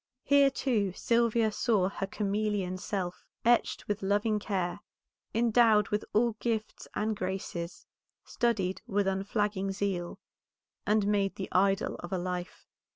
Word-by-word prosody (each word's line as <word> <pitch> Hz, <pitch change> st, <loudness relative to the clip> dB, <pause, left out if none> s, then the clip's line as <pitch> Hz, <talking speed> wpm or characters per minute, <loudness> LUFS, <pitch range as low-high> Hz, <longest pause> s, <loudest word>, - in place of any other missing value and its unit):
Here, 280 Hz, -1 st, +5 dB
too, 220 Hz, -8 st, 0 dB
Sylvia 230 Hz, 0 st, +2 dB
saw 210 Hz, -3 st, +2 dB
her 195 Hz, 0 st, -4 dB
chameleon 200 Hz, -2 st, -1 dB
self, 180 Hz, -2 st, -3 dB, 0.2 s
etched 240 Hz, 0 st, +2 dB
with 205 Hz, 0 st, -2 dB
loving 205 Hz, +2 st, +1 dB
care, 190 Hz, -3 st, -2 dB, 0.5 s
endowed 225 Hz, -2 st, +4 dB
with 210 Hz, 0 st, 0 dB
all 235 Hz, +2 st, +3 dB
gifts 220 Hz, -2 st, -3 dB
and 215 Hz, +1 st, 0 dB
graces, 185 Hz, -3 st, -4 dB, 0.4 s
studied 205 Hz, -7 st, 0 dB
with 205 Hz, -3 st, +1 dB
unflagging 195 Hz, 0 st, -1 dB
zeal, 190 Hz, -3 st, -2 dB, 0.7 s
and 210 Hz, 0 st, +3 dB
made 200 Hz, -1 st, +1 dB
the 190 Hz, -, -5 dB
idol 195 Hz, +2 st, +2 dB
of 175 Hz, -, -8 dB
a 190 Hz, -, 0 dB
life. 180 Hz, 0 st, -4 dB
205 Hz, 130 wpm, -30 LUFS, 190-220 Hz, 0.7 s, Here